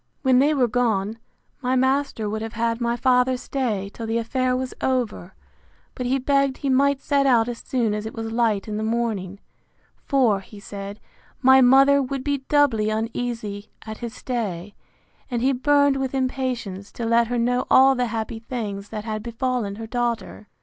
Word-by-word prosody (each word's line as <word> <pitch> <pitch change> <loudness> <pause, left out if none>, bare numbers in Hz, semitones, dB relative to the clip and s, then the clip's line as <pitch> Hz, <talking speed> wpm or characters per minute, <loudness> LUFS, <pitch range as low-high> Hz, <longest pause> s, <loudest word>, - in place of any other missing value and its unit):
When 260 -2 +4
they 295 +3 +3
were 255 -3 +3
gone, 220 -3 0 0.4
my 255 0 0
master 260 -3 +1
would 215 +1 -3
have 225 0 -5
had 230 +1 -1
my 235 0 +1
father 255 0 +3
stay 225 -7 -3
till 230 - -6
the 225 +1 0
affair 255 +2 0
was 255 0 -4
over; 235 -8 -2 0.6
but 250 - -4
he 265 +2 +2
begged 275 0 +1
he 275 -2 -1
might 280 +1 +2
set 280 -1 +2
out 235 -3 +4
as 240 -1 -5
soon 235 -5 -1
as 210 +1 -3
it - - -8
was 225 0 -4
light 225 -4 +1
in 210 -1 -3
the - - -2
morning; 220 -4 -2 0.6
for, 250 -8 +2
he 200 +1 -13
said, 200 +1 -8 0.4
my 265 +1 +7
mother 275 +2 +6
would 270 0 -3
be 285 0 0
doubly 260 -8 +3
uneasy 220 -2 -3 0.2
at 220 -1 -7
his 235 -1 -6
stay; 205 -6 -4 0.6
and 240 -2 -2
he 270 +1 +3
burned 285 +1 +3
with 270 0 -2
impatience 250 -7 -3
to 235 - -4
let 230 0 +3
her 245 +1 -2
know 245 +2 0
all 265 +1 +7
the 250 -1 0
happy 225 0 -4
things 210 -4 -5
that 215 -1 -6
had 215 -1 -3
befallen 235 -2 -2
her 225 +2 -7
daughter. 235 -2 -3
235 Hz, 185 wpm, -23 LUFS, 220-260 Hz, 0.6 s, my